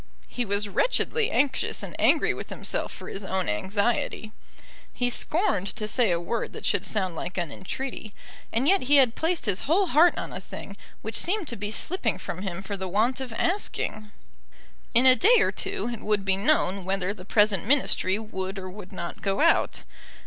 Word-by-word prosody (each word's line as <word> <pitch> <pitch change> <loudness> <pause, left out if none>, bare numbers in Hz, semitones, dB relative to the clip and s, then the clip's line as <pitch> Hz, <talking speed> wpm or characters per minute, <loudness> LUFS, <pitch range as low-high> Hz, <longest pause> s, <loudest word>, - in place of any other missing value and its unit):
He 245 - -3
was 200 0 0
wretchedly 465 - +1
anxious, 280 - 0
and - - -7
angry - - +3
with - - -8
himself - - -2
for - - -10
his 195 - -5
own 190 -1 -2
anxiety. 205 - -1 0.6
He 245 0 -1
scorned 240 - +1
to 215 - -3
say 230 0 +3
a 170 -1 +1
word 225 +7 -3
that - - -7
should 200 -1 +1
sound 190 -5 -1
like 180 +3 -5
an 170 -4 -2
entreaty; 225 - -6 0.4
and 245 +5 +1
yet 390 +3 +4
he 290 +3 +5
had 260 -5 +6
placed 325 +2 -1
his 200 -3 +1
whole 380 +5 +4
heart 340 +1 +4
on - - -5
a - - -5
thing - - -9 0.3
which - - -4
seemed 375 -1 +2
to 235 - -3
be 205 0 -4
slipping 225 - -2
from 185 -1 -6
him 190 -1 -5
for 200 +1 -4
the 190 -1 -5
want 220 +8 +1
of 260 -2 -6
asking. 225 - -2 0.9
In 245 +3 +5
a 255 -1 +9
day 435 - +5
or - - +2
two 395 -8 -3
it 230 - -7
would 210 -2 0
be 190 -1 +3
known 195 -4 +2
whether 190 +1 -1
the 190 -3 -12
present 205 0 +2
Ministry 245 -8 +2
would 195 -3 -5
or 185 -1 -6
would 195 -1 -11
not 170 0 -6
go 195 -1 -1
out. 330 +2 +2
215 Hz, 195 wpm, -26 LUFS, 190-270 Hz, 0.9 s, a